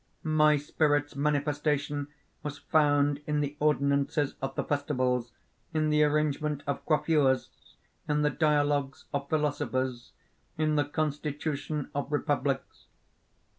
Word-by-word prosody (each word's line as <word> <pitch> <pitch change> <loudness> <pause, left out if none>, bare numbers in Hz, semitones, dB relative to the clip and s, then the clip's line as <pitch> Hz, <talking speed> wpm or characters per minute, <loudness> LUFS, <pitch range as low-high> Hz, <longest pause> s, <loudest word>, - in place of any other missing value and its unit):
My 155 -1 +4
spirit's 145 0 0
manifestation 145 0 0 0.3
was 150 -1 -5
found 145 -1 +2
in 150 0 +1
the 145 0 -2
ordinances 140 0 +1
of 135 0 -3
the - - -1
festivals, 130 -4 0 0.4
in 155 -1 +2
the 150 0 +4
arrangement 150 -1 0
of 140 -1 -3
coiffures, 150 -4 +2 0.6
in 150 0 +2
the 150 - +3
dialogues 145 -2 +1
of 140 0 -2
philosophers, 130 -5 -1 0.5
in 155 0 +1
the 145 -2 +2
constitution 150 0 -3
of 145 +1 -3
republics. 140 -2 -1
145 Hz, 115 wpm, -29 LUFS, 140-150 Hz, 0.6 s, My